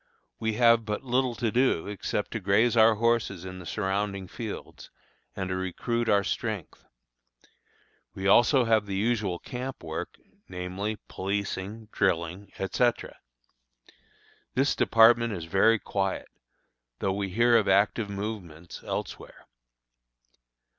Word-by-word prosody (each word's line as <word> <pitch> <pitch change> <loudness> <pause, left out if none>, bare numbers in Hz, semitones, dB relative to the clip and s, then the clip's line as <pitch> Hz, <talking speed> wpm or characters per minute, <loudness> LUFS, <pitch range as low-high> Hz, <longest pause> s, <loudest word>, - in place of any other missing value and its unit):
We 110 0 -1
have 115 0 +5
but 105 +2 -4
little 125 -1 0
to 115 -3 -1
do 125 -8 +2
except 105 0 -3
to 115 - -3
graze 105 +5 +3
our 110 0 +6
horses 110 -5 0
in 95 0 -7
the 90 - -9
surrounding 100 0 -2
fields, 110 +2 -8 0.5
and 95 -1 -3
to 95 - -1
recruit 115 +6 -2
our 100 -1 +4
strength. - - -4 1.3
We 95 - -5
also 120 +5 +5
have 110 -2 +2
the 100 - -3
usual 105 -3 0
camp 130 +1 -7
work, 80 0 -5 0.3
namely, 95 +4 -4
policing, 100 +2 -4
drilling, 90 0 -1
etc. 120 +5 0 1.4
This 135 +3 +2
department 115 0 +5
is 85 -4 -5
very 100 +6 +4
quiet, 95 -2 -3 0.7
though 95 - -1
we 100 0 -2
hear 120 +5 +3
of 110 -3 +3
active 100 +1 +2
movements 100 -5 -6
elsewhere. - - -6
105 Hz, 125 wpm, -27 LUFS, 95-115 Hz, 1.4 s, our